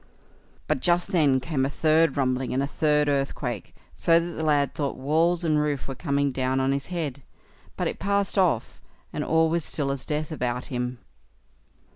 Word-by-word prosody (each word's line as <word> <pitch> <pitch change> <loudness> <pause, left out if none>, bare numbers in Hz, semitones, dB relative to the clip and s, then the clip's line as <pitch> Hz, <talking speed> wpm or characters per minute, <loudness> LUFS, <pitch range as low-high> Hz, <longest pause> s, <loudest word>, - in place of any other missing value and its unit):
But - - +1
just 175 -4 +2
then 145 -8 +3
came 130 +1 -1
a 135 - +1
third 160 +2 +2
rumbling, 130 -2 0
and 135 - +1
a - - +1
third 150 +1 +1
earthquake, 135 -5 -2 0.2
so 165 0 +4
that 170 0 -5
the - - -1
lad 145 -2 +2
thought 140 -2 -2
walls 165 +6 +2
and 155 -2 +2
roof 145 -3 -2
were 135 - -4
coming 140 -1 0
down 130 0 0
on 135 0 +1
his 140 0 -2
head; 155 -7 -4 0.6
but - - 0
it - - -4
passed 200 -1 0
off, 175 - +1 0.3
and - - -2
all 160 0 +3
was 165 0 0
still 140 -3 -2
as 140 -1 -5
death 150 +1 -2
about 125 -4 -2
him. 125 0 -2
145 Hz, 185 wpm, -25 LUFS, 135-165 Hz, 0.6 s, so